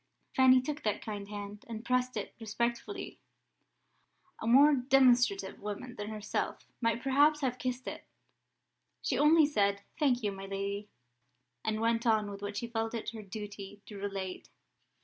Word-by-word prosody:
Fanny 260 -1 +7
took 300 +1 -4
that 210 -2 -1
kind 205 -2 -5
hand, 205 0 -7
and 225 0 -6
pressed 250 0 +1
it 205 - -4
respectfully 235 - -3 1.2
a - - -3
more 280 +5 +7
demonstrative 245 -7 +3
woman 210 +4 -5
than 210 -2 -5
herself 215 -1 -3 0.2
might 230 0 +1
perhaps 290 +3 +4
have 255 -2 -1
kissed 255 0 -3
it. - - -5 1.0
She 260 - 0
only 305 +2 +6
said, 200 -8 +1 0.2
"Thank 255 -6 +2
you, 205 - +1
my 195 0 -7
lady," 200 +1 -3 0.7
and 215 0 -1
went 230 +1 +1
on 215 -2 +2
with 200 0 -8
what 205 0 -4
she 235 - -2
felt 225 0 -2
it 230 - -3
her 225 -2 -7
duty 205 0 -8
to 210 - -10
relate. 195 -2 -5
225 Hz, 155 wpm, -32 LUFS, 205-255 Hz, 1.2 s, Fanny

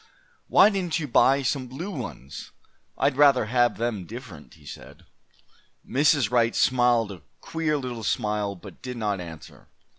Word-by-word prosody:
"Why 210 - +6
didn't 180 -5 -1
you 155 -3 -4
buy 135 +2 +3
some 135 -1 -1
blue 165 +11 -6
ones? 70 - -8 0.5
I'd 130 - +1
rather 140 -5 +5
have 120 +2 +1
them 115 -5 -2
different," 105 - -11
he 75 -2 -20
said. - - -12 0.8
Mrs. 140 -4 +2
Wright 115 -1 +2
smiled 120 -4 +2
a 90 -4 -10 0.2
queer 160 -2 -2
little 125 -4 -5
smile, 105 0 -1
but 90 - -13
did 125 -1 -6
not 105 -4 -2
answer. 80 -3 -11
120 Hz, 150 wpm, -25 LUFS, 105-140 Hz, 0.8 s, Why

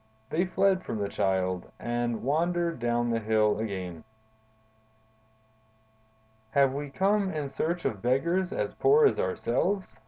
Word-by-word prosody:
They 175 +4 +1
fled 190 0 +2
from - - -4
the 100 -1 -1
Child, 95 -3 -1
and 120 -1 -2
wandered 170 +3 0
down 120 0 0
the 115 - +1
hill 110 -1 +2
again. 95 -6 -5 2.5
"'Have 135 -2 +4
we 145 +1 -4
come 195 +5 +1
in 150 -2 -3
search 170 +5 -2
of 105 -3 -2
beggars 170 - +1
as - - -2
poor 440 +2 +4
as 415 - +3
ourselves? 195 - -1
135 Hz, 130 wpm, -28 LUFS, 110-175 Hz, 2.5 s, Have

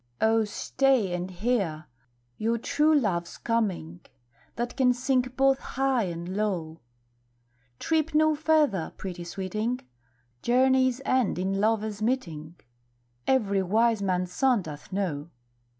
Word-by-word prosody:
O, 220 0 +3
stay 245 -1 +1
and 180 +1 -3
hear! 185 -5 -1 0.5
your 230 - 0
true 300 +6 +2
love's 175 -8 -2
coming 190 -8 -2 0.6
That 240 +2 -3
can 250 -2 +4
sing 255 +1 +1 0.2
both 270 0 +4
high 265 -4 0
and 170 +1 -5
low; 175 -7 -2 1.0
Trip 320 - 0
no 310 0 +4
further, 300 - +1
pretty 180 -2 -6
sweeting, 215 +7 -3 0.6
Journeys 260 +1 +3
end 255 -8 +1
in 190 +2 -1
lovers' 215 -1 0
meeting 170 -10 -2 0.7
Every 200 -7 +2
wise 220 +3 +2
man's 180 -2 -1
son 255 -5 +2
doth 150 +2 -9
know. 170 -6 -2
215 Hz, 120 wpm, -27 LUFS, 180-260 Hz, 1.0 s, can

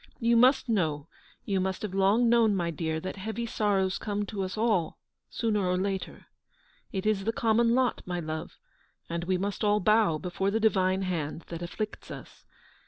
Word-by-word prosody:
You 235 0 +3
must 255 +3 +5
know, 160 -9 0 0.4
you 195 -2 0
must 190 +2 -2
have 205 -3 -4
long 200 +5 +3
known, 230 -3 +4
my 170 -3 -1
dear, 160 0 -2
that 185 +3 -5
heavy 220 +4 -4
sorrows 200 -4 0
come 205 0 -2
to 200 -1 -5
us 190 +2 -4
all, 215 -8 +1 0.3
sooner 215 -3 0
or 180 0 +1
later. 190 0 -3 0.7
It 190 -1 -3
is 210 -2 +1
the 225 - 0
common 230 +1 +2
lot, 255 -1 +1
my 175 -1 -2
love, 155 -1 -5 0.5
and 170 0 -2
we 185 +1 +1
must 200 +3 -3
all 210 0 +3
bow 210 -5 +3
before 180 +4 -2
the 220 +2 0
Divine 190 -3 +2
hand 165 -3 -3
that 170 0 -6
afflicts 210 +5 -5
us. - - -11
195 Hz, 180 wpm, -28 LUFS, 180-220 Hz, 0.7 s, must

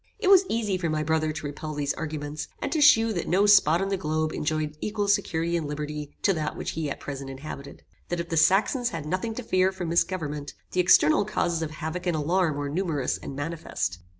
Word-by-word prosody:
It 405 -3 +2
was 385 -1 +7
easy 210 -5 0
for 170 -2 -1
my 155 0 0
brother 155 0 +1
to 155 - -6
repel 150 +1 -5
these 145 -1 -1
arguments, 150 -1 -5
and - - -3
to 315 - +1
shew 225 -6 +6
that 175 - -3
no 195 +3 +3
spot 195 -4 +5
on 195 - -2
the 195 - 0
globe 155 -2 -1
enjoyed 155 0 -2
equal 210 -1 -1
security 170 -5 +1
and 165 -3 -1
liberty 150 0 -5
to 195 - +4
that 155 -3 -3
which - - -3
he 160 -2 -3
at - - -5
present 140 -1 -6
inhabited. 140 +1 -8 0.3
That 175 - -2
if 170 0 -4
the 165 - -1
Saxons 200 - +3
had 165 -9 -5
nothing 185 +8 -2
to 250 - -5
fear 185 -3 +2
from 185 -3 -5
mis 170 +1 +4
government, 150 -6 -5 0.2
the 185 - -1
external 175 0 +5
causes 175 -5 -1
of 160 - -2
havoc 160 +3 -5
and 175 - +1
alarm 160 0 +1
were 145 0 -2
numerous 155 -3 -1
and 135 - -7
manifest. 145 - -3
160 Hz, 225 wpm, -26 LUFS, 150-190 Hz, 0.3 s, was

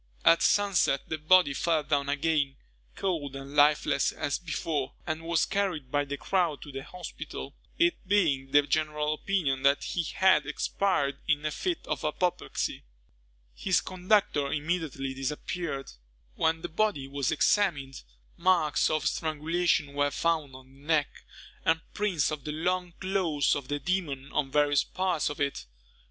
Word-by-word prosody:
At 165 - +6
sunset, 200 -9 +2
the 160 - -2
body 155 -1 +5
fell 160 0 +1
down 140 -1 0
again, 145 -1 +1 0.4
cold 155 -8 -2
and 135 +1 -8
lifeless 145 -1 +4
as 145 - -2
before, 155 -5 -3
and 155 -1 -3
was 165 0 +1
carried 185 -10 -2
by 145 0 +1
the 140 0 -4
crowd 175 -5 0
to 145 - -10
the 135 0 -5
hospital, 180 +4 -8 0.2
it 345 0 +3
being 155 -10 +2
the 145 +1 +5
general 150 0 0
opinion 155 -6 -1
that 140 +1 +3
he 175 - -1
had 190 +3 +3
expired 140 -9 0
in 150 -1 +1
a 155 - 0
fit 355 - -3
of - - -3
apoplexy. 175 +4 -1 0.7
His 185 - +1
conductor 185 -6 +1
immediately 150 -4 -2
disappeared. 135 +2 -4 0.4
When 160 - 0
the - - -2
body 165 -6 0
was 140 -1 -1
examined, 145 -10 +1 0.4
marks 170 -7 +3
of 155 -1 0
strangulation 155 -1 0
were 145 0 +2
found 155 -2 -1
on 130 0 -12
the 135 +1 -20
neck, 155 -3 +2 0.5
and 165 0 +3
prints 190 -8 0
of 150 -3 -5
the 150 - -4
long 180 +3 -1
claws 185 -7 +1
of 140 -3 -5
the 145 - -1
demon 145 -4 -2
on 140 -2 0
various 145 0 +3
parts 185 -4 -1
of 145 - -7
it. 140 - -2
155 Hz, 150 wpm, -28 LUFS, 140-180 Hz, 0.7 s, At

